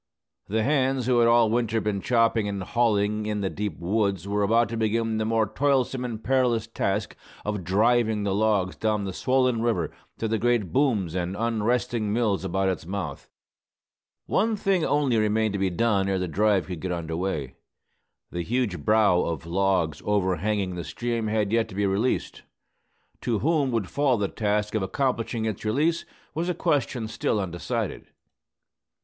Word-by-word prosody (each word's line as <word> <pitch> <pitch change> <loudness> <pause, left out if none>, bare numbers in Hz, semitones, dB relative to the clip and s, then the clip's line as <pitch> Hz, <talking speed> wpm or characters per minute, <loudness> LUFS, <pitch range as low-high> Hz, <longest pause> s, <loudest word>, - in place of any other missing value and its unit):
The 110 +2 0
hands 135 -2 +1
who 125 -1 +3
had 115 - +5
all 115 -2 +4
winter 115 -1 +1
been 105 -2 -2
chopping 115 -2 +2
and 100 -2 -3
hauling 105 -1 +1
in 105 -1 -1
the 95 - -1
deep 105 -5 -4
woods 100 0 -1
were 105 +1 0
about 115 +3 +3
to 115 - -4
begin 110 0 0
the 110 - 0
more 110 0 +2
toilsome 130 +3 0
and 115 -3 -5
perilous 125 -3 +2
task 105 -2 -2 0.3
of 105 -2 -2
"driving" 110 +3 +2
the 100 -1 0
logs 100 -3 +1
down 110 -2 0
the 95 -1 -4
swollen 130 +1 +1
river 110 -9 0 0.3
to 115 - -2
the 110 0 0
great 120 -6 +1
booms 115 - +1
and 90 +1 -2
unresting 115 -1 0
mills 105 -4 +1
about 95 +1 0
its 95 -3 -1
mouth. 90 -7 -5 1.0
One 225 +1 +1
thing 195 -4 +1
only 145 -6 +2
remained 110 0 +1
to 100 - -2
be 95 -1 +1
done 100 +1 +1
ere 95 - +1
the 90 0 -2
drive 100 +2 +2
could 90 -3 -6
get 90 +2 -3
under 80 -2 -3
way. 80 -7 -3 0.8
The 85 - -3
huge 115 -1 -1
"brow" 105 -5 +4
of 80 -2 -3
logs 90 -3 0
over 95 -3 +1
hanging 100 0 -1
the 85 -1 -5
stream 115 +3 -3
had 105 -2 0
yet 115 0 +1
to 95 - -10
be 100 0 +1
released. 100 +6 -1 0.8
To 115 -3 0
whom 150 +2 +1
would 115 -6 -1
fall 140 -4 +1
the 100 -1 0
task 105 0 -1
of 110 - 0
accomplishing 115 +2 -1
its 110 -3 -3
release, 150 +10 +1 0.3
was 165 +4 -2
a 180 - 0
question 125 -7 0
still 110 -1 -1
undecided. 85 -4 -3
110 Hz, 175 wpm, -26 LUFS, 95-120 Hz, 1.0 s, had